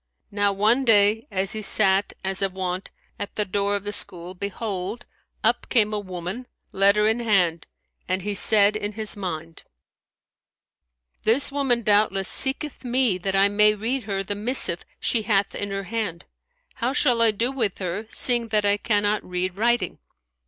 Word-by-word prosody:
Now 205 0 +1
one 215 +7 +2
day, 220 +1 +3
as 195 0 -1
he 215 - -4
sat 195 -1 +3
as 190 0 -1
of 195 -1 -1
wont, 185 0 -4 0.3
at 205 - -6
the 210 - 0
door 200 +1 -1
of 200 - -4
the 205 - -4
school, 180 -3 -2
behold, 200 +2 -5 0.4
up - - 0
came 215 -4 +2
a 210 - -1
woman 185 +5 -7 0.2
letter 200 +2 +3
in 220 +2 +1
hand, 180 -8 +1 0.4
and 185 0 -2
he 205 +1 -3
said 205 +1 +4
in 210 0 -3
his 215 0 -1
mind, 165 -4 -6 1.6
"This 240 +6 +4
woman 265 -4 0
doubtless 205 -2 +2
seeketh 270 +2 +2
me, 245 -6 +2
that 195 +2 -2
I 195 +1 +5
may 210 +1 +3
read 230 +3 -3
her 195 -2 -2
the 200 - -4
missive 210 -4 +1 0.2
she 230 - 0
hath 205 -2 0
in 200 - -4
her 195 0 -4
hand: 200 -4 -4 0.6
how 245 +3 0
shall 250 -5 +2
I 230 - +5
do 230 +4 0
with 230 -8 -1
her, 190 +4 -5
seeing 240 -1 +2
I 205 -1 +2
cannot 205 0 0
read 180 0 -3
writing?" 235 +3 0
205 Hz, 165 wpm, -23 LUFS, 195-225 Hz, 1.6 s, I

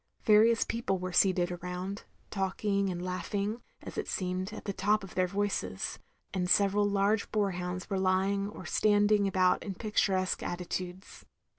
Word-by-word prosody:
Various 225 +2 +5
people 230 -4 -1
were 185 0 -5
seated 185 -2 +3
arotmd, 180 +3 -5 0.3
talking 195 0 0
and 180 0 -4
laughing, 200 +4 -2 0.2
as - - -6
it - - -3
seemed, 185 +1 -2
at 220 - -9
the 200 - -2
top 205 +2 +1
of 190 - -9
their 185 0 +2
voices; 185 - -2 0.3
and 180 -2 -1
several 205 +1 +3
large 200 +1 +1
boar 205 -2 +1
hounds 180 0 -4
were 195 -2 -1
lying 190 +2 +1
or - - -10
standing 205 -1 +3
about 185 -1 +3
in 195 - -5
pic 215 +2 -6
turesque 185 -1 +2
attitudes. 180 +1 -5
195 Hz, 160 wpm, -30 LUFS, 185-205 Hz, 0.3 s, Various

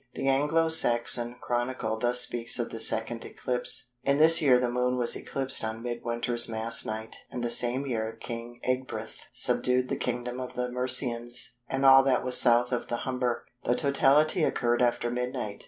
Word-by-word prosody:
The - - -3
Anglo 150 +4 +2
Saxon 120 -4 +2
Chronicle 120 -2 -2
thus 125 +1 +2
speaks 115 -1 0
of 120 - -3
the 115 - -6
second 115 +1 +2
eclipse:—"In 125 +2 -2
this 160 +2 +6
year 135 -5 +5
the 125 0 0
Moon 125 +1 0
was 120 -1 0
eclipsed 135 -3 -2
on 110 +1 -5
Mid 120 -1 -5
winter's 120 0 +2
Mass 115 +1 +1
night, 110 0 -6
and 125 - -6
the 120 - -1
same 125 +3 +1
year 110 -4 -4
King 120 0 -8
Ecgbryht 130 0 -4
subdued 125 0 +1
the - - -1
kingdom 125 0 -4
of 125 -1 -7
the 125 0 -3
Mercians 125 -1 -1
and 135 0 -1
all 135 0 +8
that 135 -2 +1
was 125 -1 0
South 120 0 +4
of 125 - -3
the 120 - -4
Humber." 125 -2 -2 0.2
The 120 - +1
totality 145 +4 +2
occurred 120 -4 0
after 120 -1 0
midnight. 125 -4 -4
125 Hz, 175 wpm, -27 LUFS, 120-130 Hz, 0.2 s, all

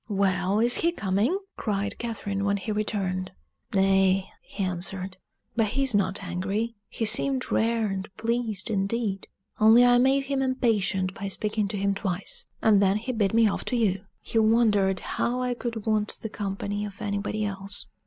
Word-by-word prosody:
"Well, 195 0 +1
is 240 +2 +4
he 335 - +2
coming?" 215 - 0 0.2
cried 205 -2 -2
Catherine, 205 -4 -3
when 200 0 +1
he 200 +3 -4
returned. 195 -3 -2 0.4
"Nay," 195 0 +3
he 200 - -5
answered; 185 +1 -3 0.4
"but 225 -2 +2
he's 270 +3 0
not 200 0 0
angry: 195 +6 -2 0.2
he 225 - -2
seemed 255 +4 +2
rare 230 0 +2
and 195 -1 -3
pleased 225 -2 -1
indeed; 200 0 -1 0.3
only 225 +3 +7
I 245 0 +5
made 270 +2 +3
him 270 0 -1
impatient 220 -8 +1
by 200 - -5
speaking 210 +1 -1
to 205 +1 -4
him 200 0 +1
twice: 195 -1 -3 0.2
and 210 -2 +5
then 195 +1 +3
he 230 +4 -3
bid 220 -3 0
me 230 - +5
be 220 - +5
off - - -3
to 250 - -1
you; 200 -5 +1 0.2
he 225 - 0
wondered 215 -4 +3
how 245 +1 -1
I 250 0 0
could 235 -3 -5
want 215 -1 0
the 220 - -3
company 205 0 -3
of 200 -2 -7
anybody 205 +1 -2
else." 195 0 -4
205 Hz, 175 wpm, -26 LUFS, 195-230 Hz, 0.4 s, only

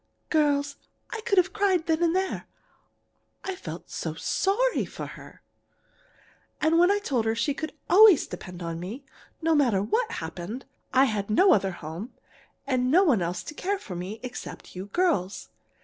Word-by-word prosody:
"Girls, 290 -2 +2 0.3
I 445 - -4
could 400 -2 0
have 365 +1 +4
cried 390 -5 +2
then 320 0 +1
and 340 0 +2
there 380 0 -1 1.0
I 385 - -3
felt 370 - -8
so - - -4
sorry 480 +6 +1
for - - -7
her. - - -12 1.2
And 320 +2 +4
I 405 - +3
told 265 - -1
her 225 0 +1
she 285 +5 0
could 315 +3 -5
always 395 -2 +7
depend 180 0 -8
on 165 0 -4
me, 220 +11 -7 0.4
no 325 0 +3
matter 240 -10 +3
what 445 - 0
happened. 175 +9 -6 0.3
I 265 +1 +5
had 210 -5 -2
no 375 - +6
other 195 -2 +2
home 170 - -7 0.5
and 255 -2 +1
no 355 +8 +6
one 265 - +3
else 175 +1 -2
to - - -7
care 395 +6 -1
for 200 - -8
me 185 +5 -5
except 250 -5 -8
you 185 +2 -6
girls. 205 - 0
280 Hz, 165 wpm, -27 LUFS, -, 1.2 s, always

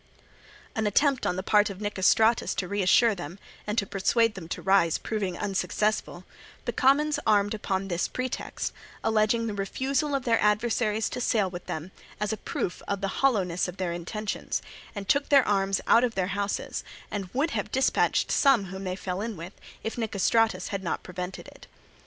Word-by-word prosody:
An 220 -1 0
attempt 275 +5 +2
on - - 0
the 185 - -3
part 210 +1 +4
of 195 -1 -7
Nicostratus 210 +3 +2
to 180 - -2
reassure 205 +4 +4
them 175 -1 -7 0.3
and 210 +2 -2
to 200 - +2
persuade 220 +4 +2
them 185 -5 -8
to - - -4
rise 190 -4 +3
proving 195 -5 -3
unsuccessful, 210 +1 -1 0.4
the - - 0
commons 290 +3 +3
armed 205 -1 +3
upon 195 -2 -2
this 175 -2 -1
pretext, 255 0 -4 0.3
alleging 220 +1 +2
the 220 - -2
refusal 265 +8 -1
of 270 - -2
their 230 -2 +3
adversaries 215 0 +1
to 250 - -4
sail 210 -6 +1
with 175 -1 -8
them 160 +4 -5 0.3
as 210 +1 -1
a - - -3
proof 175 - -4
of 200 0 -2
the 195 - -1
hollowness 190 -11 +2
of 180 +1 -7
their 180 -2 -2
intentions, 205 +5 -3 0.3
and 200 -1 -5
took 280 0 +2
their 275 -3 +6
arms 195 -1 +2
out 235 - +5
of 240 -2 0
their 185 -1 0
houses, 200 0 -2 0.3
and 195 -3 -4
would 290 +6 0
have 210 -2 -3
dispatched 265 0 +2
some 270 -8 +4
whom 190 0 -6
they 185 0 -2
fell 185 0 -4
in 220 -2 -4
with, 170 +4 -8 0.3
if 225 +2 -4
Nicostratus 220 -2 +1
had 195 -2 -3
not 170 - -2
prevented 180 +1 -6
it. - - -14
205 Hz, 180 wpm, -27 LUFS, 190-230 Hz, 0.4 s, their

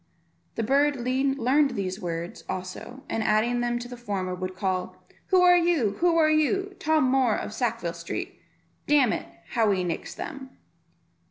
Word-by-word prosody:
The 225 - -1
bird 280 +5 +3
learned 265 +2 +1
these 190 0 -3
words 170 -1 -5
also, 190 +8 -6
and 225 - -2
adding 220 +3 +2
them 240 0 0
to 240 0 -6
the 245 - -8
former, 200 -6 -3
would 185 0 -5
call, 185 -1 -2 0.3
"Who 370 -1 +4
are 355 0 +7
you? 335 - +2
who 340 -1 +3
are 310 -1 +4
you? 380 +6 +1
Tom 315 -4 +2
Moor 255 -4 +3
of - - -5
Sackville 230 -8 -2
Street. - - -6 0.5
Damn 280 -6 +4
it, - - -4 0.2
how 225 -3 +2
he 190 -2 +1
nicks 170 -2 -4
them." 275 -4 -8
245 Hz, 165 wpm, -26 LUFS, 200-290 Hz, 0.5 s, are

